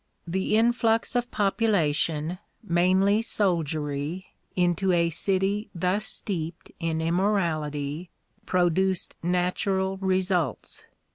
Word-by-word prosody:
The 190 +4 0
influx 230 +1 +2
of 245 0 0
population, 175 -6 +1 0.2
mainly 190 +3 +3
soldiery, 160 -5 -1 0.3
into 180 +1 +2
a 170 -1 +2
city 195 +4 0
thus 185 +5 0
steeped 170 -6 -3
in 160 -1 -1
immorality, 165 -4 -1 0.4
produced 185 +1 +1
natural 190 +2 0
results. 185 - -1
180 Hz, 85 wpm, -26 LUFS, 165-195 Hz, 0.4 s, mainly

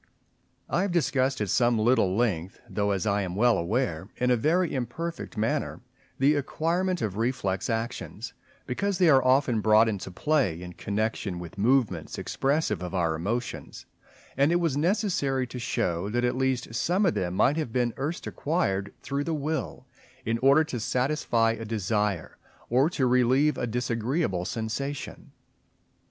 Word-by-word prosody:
I 175 - 0
have 200 -1 0
discussed 135 -7 +1
at 105 - -1
some 120 0 +3
little 110 -4 +2
length, 95 -7 -1
though 105 -1 -1
as 95 -3 0
I 100 -1 +1
am 90 -2 -4
well 120 +3 +4
aware, 95 -2 -1
in 125 0 +1
a - - +5
very 165 +8 +1
imperfect 140 +3 -4
manner, 110 +1 -1 0.4
the 140 +3 +4
acquirement 170 +5 -1
of 100 -2 -3
reflex 100 -6 -1
actions, 115 0 -4 0.3
because 200 +10 -1
they 180 -3 +5
are 135 -3 +6
often 130 -3 +3
brought 110 +1 +5
into 100 -3 -3
play 110 - 0
in 90 0 -8
connection 105 -2 -2
with 85 +4 -9
movements 110 - +1
expressive 145 - 0
of 90 +1 -5
our 85 -3 +1
emotions; 105 +10 -4 0.5
and 140 +4 +3
it - - +3
was 165 -6 0
necessary 155 - +1
to 125 0 -7
show 90 -5 -1
that 120 +3 0
at 120 - 0
least 130 -3 -1
some 180 - +1
of 175 - +3
them 90 -1 -2
might 145 +9 +3
have 155 -8 -2
been 120 0 +1
first 145 +8 -4
acquired 105 - -1
through 140 +1 -2
the 165 - -1
will 150 -2 -3 0.4
in 115 +1 0
order 140 +5 +5
to 140 -6 -5
satisfy 125 -2 +1
a 115 0 -5
desire, 105 -4 -2 0.3
or 130 +6 +4
to 140 -6 0
relieve 125 +4 +3
a 125 - -2
disagreeable 115 - -1
sensation. 130 +7 -4
120 Hz, 160 wpm, -27 LUFS, 105-145 Hz, 0.5 s, are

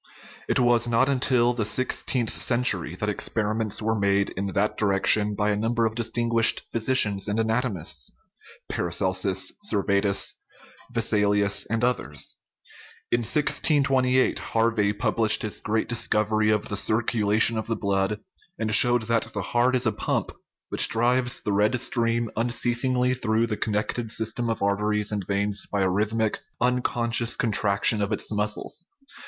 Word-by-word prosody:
It - - +2
was 120 -1 +2
not 120 +2 +2
until 125 -2 +2
the 120 -2 -2
sixteenth 120 +1 -1
century 110 -9 0
that 105 - -4
experiments 110 +1 -1
were 110 +1 +1
made 100 -2 0
in 100 +1 -4
that 105 +1 0
direction 105 +1 +1
by 105 +1 0
a - - 0
number 115 +2 0
of 110 - -1
distinguished 115 0 +1
physicians 110 -4 +1
and 105 +1 -2
anato 115 +2 0
mists 80 -5 -2 0.6
(Paracelsus, 95 +2 -1
Servetus, 100 - 0 0.5
Vesalius, 105 -1 +1
and 115 +1 -1
others). 85 - -1 0.7
In 120 - +2
1628 130 0 +1
Harvey 115 -2 0
published 110 +1 +2
his 105 - -4
great 110 +1 -1
discovery 110 -2 +1
of 105 -1 0
the 100 - -3
cir 110 +3 +2
culation 110 0 +2
of 110 - -4
the 115 - -1
blood, 100 0 -1 0.4
and 110 -1 -2
showed 120 +1 +4
that 115 0 0
the 100 - -2
heart 125 +2 +2
is 125 0 +1
a 110 - +2
pump, - - -2 0.4
which - - +4
drives 120 +2 +1
the 105 - -2
red 105 +5 +1
stream 115 -2 0
unceasingly 125 +2 +1
through 115 -2 0
the 110 -2 -3
connected 110 +2 -3
system 115 +2 -1
of 115 -3 -2
arteries 105 +1 0
and 100 -3 -4
veins 100 0 0
by 100 - -1
a - - +2
rhyth 105 +4 0
mic, 110 -2 -1 0.2
unconscious 120 -1 +1
contraction 105 -3 +2
of 100 +1 -2
its 105 - -2
muscles. 105 0 -3
110 Hz, 150 wpm, -24 LUFS, 105-120 Hz, 0.7 s, showed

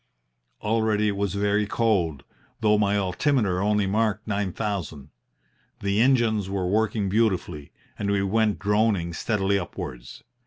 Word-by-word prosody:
Already 105 -1 +1
it 100 - -2
was 100 -1 -2
very 105 +1 +1
cold, 90 -12 0 0.4
though 105 -1 +4
my 105 -1 +2
altimeter 95 0 +1
only 105 0 +2
marked 105 +2 0
nine 100 -2 -1
thousand. 85 -9 -4 0.7
The 100 +2 +1
engines 115 -6 +2
were 95 -2 -2
working 105 +1 0
beautifully, 95 -8 -1 0.3
and 100 - -1
we 100 -1 +1
went 105 +1 +1
droning 105 -4 +1
steadily 100 +1 0
upwards. 75 -9 -8
100 Hz, 130 wpm, -25 LUFS, 95-110 Hz, 0.7 s, though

